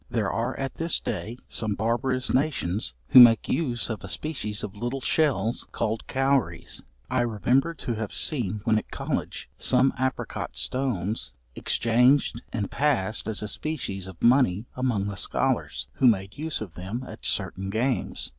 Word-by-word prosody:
There 110 -4 0
are 120 +3 -2
at 135 0 -4
this 165 0 0
day, 110 +4 -4
some 105 -2 -1
barbarous 120 +4 0
nations, 105 - 0
who - - +9
make 115 -2 +8
use 120 -10 -1
of 110 -6 -5
a 100 - -7
species 105 - -2
of 105 -1 -6
little 120 +6 -3
shells, 125 -6 +1
called 110 0 -2
cowries. 135 -1 0 0.3
I - - +2
remember 125 +7 +1
to 120 - -4
have 110 -2 -4
seen 110 - +2
when 110 -1 +3
at - - -12
college, - - -3
some 130 +1 +4
apricot 130 0 -3
stones 110 - -1 0.2
exchanged 120 - +2
and 105 -4 -3
passed 115 -9 +1
as 110 -1 0
a - - -3
species 100 - -3
of 95 -3 -11
money 120 -5 +4
among 125 -6 0
the 100 - -3
scholars, - - 0
who 130 - +3
made 95 -3 +2
use 155 -1 -3
of 100 -6 -6
them 100 +9 -5
at - - -10
certain 95 +1 -1
games. 120 +5 -1
115 Hz, 160 wpm, -26 LUFS, 105-130 Hz, 0.3 s, who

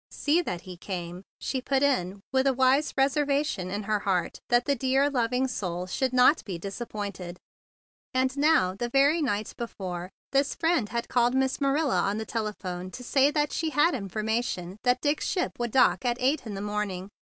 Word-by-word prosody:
"See 310 +4 +1
that 175 - -4
he 185 -1 -10
came 175 -1 -6
" - - -78
she 260 - -2
put 270 +1 +1
it, 200 -9 +1 0.2
with 265 +1 +3
a 265 - +2
wise 265 +3 +3
reserva¬ 280 +1 +2
tion 185 -10 -3
in 205 +2 -3
her 210 +1 0
heart 185 -4 -1
that 240 0 +3
the 285 - +2
dear, 270 +3 +2
loving 250 0 +1
soul 180 -7 -3
should 255 +7 -1
not 255 +5 +5
be 185 -4 -5
disappointed. 200 -2 -6 0.7
And 260 0 +1
now, 280 -11 +3
the 240 +5 -3
very 280 +6 +3
night 215 -7 -1
before, 185 -6 -5 0.2
this 275 0 +1
friend 325 -10 +1
had 235 0 -3
called 245 0 +2
Miss 265 +1 0
Marilla 280 +1 +2
on 200 +1 0
the 220 - -3
telephone 190 -5 -4
to 250 +6 -9
say 270 +2 +3
that 295 0 0
she 325 - -1
had 300 +2 +3
informa¬ 220 +1 -1
tion 180 -4 -5
that 250 0 +2
Dick's 295 +1 0
ship 360 - 0
would 240 0 -1
dock 260 +3 +3
at 240 -1 0
eight 265 0 +1
in 205 - -5
the 195 - -5
morning. 205 -2 -3
240 Hz, 200 wpm, -27 LUFS, 195-275 Hz, 0.7 s, not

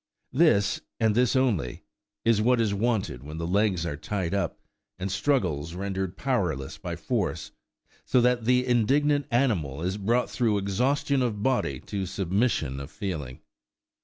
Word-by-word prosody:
This, 135 -9 +3 0.2
and 110 -2 +3
this 125 +3 +2
only, 105 - 0 0.4
is 115 -2 +4
what 125 +2 +3
is 110 -3 +1
wanted 105 - -1
when 75 +3 -8
the 85 - -3
legs 95 -1 +1
are 85 -4 -2
tied 95 +3 -3
up, 100 - -1 0.4
and 95 +1 -3
struggles 90 - 0
rendered 95 0 -3
powerless 90 - -1
by - - -4
force, - - -2 0.5
so 125 - +3
that 120 -1 +2
the 125 +1 +3
indignant 140 +4 +2
animal 90 - 0
is 95 +3 -1
brought 115 +5 +1
through 115 -4 +1
exhaustion 130 +8 +1
of 105 -5 -1
body 125 - +1
to 100 -3 -4
submission 95 - 0
of 70 +1 -7
feeling. 75 -8 -5
100 Hz, 150 wpm, -27 LUFS, 90-125 Hz, 0.5 s, is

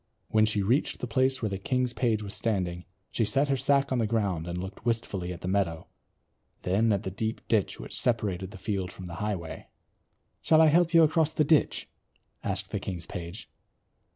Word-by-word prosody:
When 110 0 +4
she 105 -2 0
reached 120 +9 +1
the - - -3
place 130 +1 +2
where 110 - +1
the 95 -1 -4
king's 125 +3 0
page 110 -5 0
was 100 0 -7
standing 90 -6 -1 0.3
she - - 0
set 135 +7 +2
her 135 - +3
sack 140 +1 +2
on 130 - +1
the 115 - +1
ground 100 -7 -1
and 85 0 -3
looked 95 +3 -7
wistfully 110 -6 -1
at 85 - -7
the - - -4
meadow, 90 -4 0 0.8
then 105 +5 +2
at 100 -2 0
the 95 - -4
deep 110 +3 -4
ditch 110 -4 +1
which - - -4
separated 100 -6 0
the 100 - -10
field 95 -1 -3
from 95 - -9
the 85 - -7
highway. 85 -6 -4 0.7
"Shall 155 - +4
I 160 -1 +7
help 170 +2 +3
you 165 - +8
across 160 0 +2
the 155 - +3
ditch?" 150 +1 +2 0.6
asked - - -3
the - - -1
king's 90 -3 -5
page. 90 +6 -7
105 Hz, 200 wpm, -28 LUFS, 95-130 Hz, 0.8 s, you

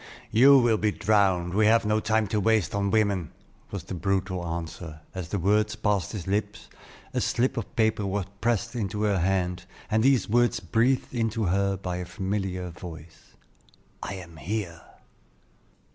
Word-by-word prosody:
"You 135 +5 +7
will 120 -4 +3
be 105 0 +2
drowned; 95 -5 +2
we 105 +2 +4
have 115 0 +4
no 105 +1 +2
time 110 0 +1
to 105 - 0
waste 110 -2 +2
on 100 0 0
women;" 100 -6 +1 0.4
was 100 -4 -5
the 95 - -7
brutal 95 +1 -1
answer; 80 -1 -6
but 95 - -5
as 85 -3 -6
the 100 - -1
words 105 +4 +2
passed 105 -2 0
his 100 -6 -5
lips, 105 +2 -2 0.4
a - - 0
slip 130 +2 +1
of 115 -5 -5
paper 110 -2 +1
was 95 -1 -1 0.2
pressed 120 +1 0
into 105 -2 -2
her 100 -3 +2
hand, 90 -1 0 0.3
and 110 +1 +3
these 135 0 +3
words 120 +2 +2
breathed 125 +4 +1
into 115 -2 -1
her 100 +1 +1
ear - - -4
by 90 -2 -4
a 90 - -4
familiar 95 -1 -3
voice: 80 -2 -12 0.7
"I 100 - -5
am 85 -3 -10
here!" 85 0 -4
100 Hz, 175 wpm, -26 LUFS, 90-110 Hz, 0.7 s, You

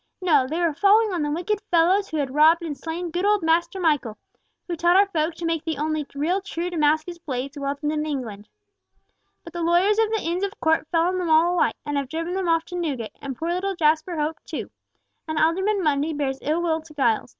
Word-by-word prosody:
No, 305 -9 +3
they 320 +5 -3
were 340 -3 +1
falling 405 +6 +4
on 345 - -1
the 295 - -1
wicked 360 +7 -2
fellows 365 +4 +3
who 315 - -3
had 275 -3 -2
robbed 320 +3 +5
and 310 -3 -4
slain 330 +3 -5
good 350 +3 -2
old 410 -2 +2
Master 340 +3 +1
Michael, 295 -10 0 0.5
who 350 - -2
taught 345 +2 +3
our 400 - +6
folk 320 -4 -1
to 335 - -6
make 330 -1 -1
the 320 -3 -3
only 305 0 -2
real 340 +7 0
true 360 -2 -4
Damascus 315 +2 0
blades 275 -2 -5
welded 285 +1 -2
in 305 0 -1
England. 235 -9 -5 0.9
But 335 - -11
the 345 - -4
lawyers 355 +6 +3
of 445 -1 +3
the 440 -2 -1
Inns 345 +3 -2
of 400 +1 -4
Court 320 -1 +1
fell 330 -1 +1
on 365 +2 0
them 350 -2 -2
all 325 +3 +4
alike, 355 - +1
and 290 -1 -2
have 275 -2 -2
driven 330 +3 -3
them 375 -2 -1
off 330 0 +2
to 355 - -8
Newgate, 280 -10 -3
and 270 -3 -6
poor 330 +1 -3
little 375 +3 -1
Jasper 315 +1 +1
Hope 305 +1 -2
too. - - -6 0.6
And 315 0 -3
Alderman 380 +6 +1
Mundy 300 +1 +1
bears 275 -2 -2
ill 315 +4 0
will 325 -2 0
to 310 -1 -16
Giles. 240 -6 +1
325 Hz, 230 wpm, -23 LUFS, 300-355 Hz, 0.9 s, our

